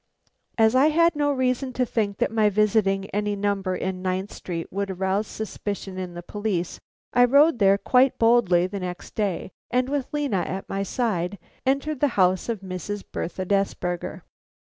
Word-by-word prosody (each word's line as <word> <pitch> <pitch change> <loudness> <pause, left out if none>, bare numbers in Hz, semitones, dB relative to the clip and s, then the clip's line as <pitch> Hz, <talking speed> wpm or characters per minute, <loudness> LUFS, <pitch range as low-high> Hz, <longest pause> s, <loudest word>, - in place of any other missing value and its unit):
As 220 0 +5
I 265 +3 +5
had 335 +1 +3
no 290 -1 +1
reason 255 -1 0
to 250 - +1
think 210 -4 -1
that - - 0
my 220 -2 +3
visiting 205 -1 +2
any 205 0 -1
number 200 -2 -1
in 185 0 -3
Ninth 185 +1 -2
Street 170 -2 -5
would 200 0 -2
arouse 190 +3 -1
suspicion 200 -2 -5
in 180 -2 -6
the 175 - -7
police, 200 -3 -3 0.3
I 245 - +6
rode 280 +3 +5
there 195 -1 +5
quite 255 +5 +3
boldly 225 -7 +4
the 195 +2 -4
next 180 -1 -6
day, 200 -3 -2 0.2
and 250 +1 +1
with 280 -2 -2
Lena 290 -8 0
at 190 +2 -4
my 195 - -2
side, 200 -3 -1 0.3
entered 275 +2 0
the 290 - +4
house 185 +2 +3
of 225 -4 -2
Mrs. 190 +2 -5
Bertha 185 +2 -4
Desberger. 185 -2 -1
205 Hz, 170 wpm, -24 LUFS, 190-245 Hz, 0.3 s, I